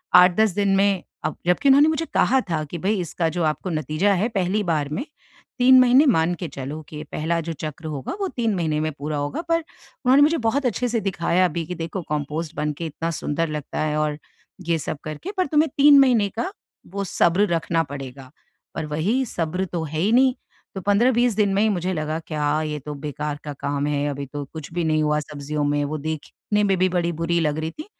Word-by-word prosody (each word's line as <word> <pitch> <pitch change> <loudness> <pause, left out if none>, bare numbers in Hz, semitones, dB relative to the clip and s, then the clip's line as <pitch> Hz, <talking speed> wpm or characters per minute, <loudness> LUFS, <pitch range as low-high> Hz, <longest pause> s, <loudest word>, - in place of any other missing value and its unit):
8-10 180 +4 +6
दिन 200 -1 +2
में 195 -1 +2 0.2
अब, - - -1
जबकि 180 +11 +3
उन्होंने 280 +3 +7
मुझे 315 +1 -1
कहा 265 - +4
था 160 -2 0
कि 160 +4 -6
भई 200 +4 0
इसका 170 0 -2
जो 170 +1 -2
आपको 155 +4 -1
नतीजा 155 +5 +1
है, 195 +4 +1
पहली 200 -1 0
बार 155 -6 0
में, 195 - -3 0.5
3 255 +1 +7
महीने 255 +3 +6
मान 170 - +3
के 175 - -5
चलो, 140 +3 -6
कि 150 - -8
ये 150 - -5
पहला 165 +2 -1
जो 165 +1 -4
चक्र 155 0 -7
होगा, 145 -4 -4
वो 390 - +1
3 230 -7 -1
महीने 160 -4 0
में 155 0 -1
पूरा 150 +1 -3
होगा। 145 - -2
पर 330 0 +3
उन्होंने 275 -4 0
मुझे 320 +3 +3
बहुत 275 +4 +1
अच्छे 245 +1 0
से 230 0 0
दिखाया 180 0 +2
भी 165 - -1
कि 180 - -4
देखो 165 +3 -4
कंपोस्ट 150 +2 -3
बनके 150 +2 -3
इतना 165 +2 -3
सुंदर 160 0 -2
लगता 150 -2 -5
है 155 -1 0
और, 150 -1 0 0.5
ये 165 -1 +2
सब 150 - -4
करके, 155 - -6
पर 370 - +2
तुम्हें 305 +2 +3
3 285 0 +8
महीने 240 -7 +4
का, 235 - -3 0.4
वो 200 +2 -4
सब्र 185 +3 +2
रखना 165 -1 0
पड़ेगा। 135 -1 -8 0.4
पर 160 - -3
वही 180 - 0
सब्र 180 -2 -2
तो 170 -2 -4
है 155 0 -4
ही 195 +6 +2
नहीं। 260 +1 +5 0.4
तो 190 - -4
15-20 235 +5 +3
दिन 205 -2 +2
में 200 - +2
ही 220 - +3
मुझे 185 -2 -1
लगा 155 -1 -2
क्या 150 -1 0
ये 150 -1 -3
तो 150 +2 -7
बेकार 150 0 -3
का 150 - -5
काम 140 0 -1
है। 145 0 0
अभी 140 0 -4
तो 145 +2 -6
कुछ 160 -2 -8
भी 175 0 -1
नहीं 155 -1 +2
हुआ 150 0 +2
सब्जियों 150 0 -4
में। 145 0 +1
वो 155 +2 -3
देखने 155 +7 -3
में 195 -2 +2
भी 185 0 +3
बड़ी 175 -1 0
बुरी 170 +1 +1
लग 150 -1 0
रही 160 +1 -3
थीं। 305 - -9
170 Hz, 220 wpm, -23 LUFS, 150-205 Hz, 0.5 s, 3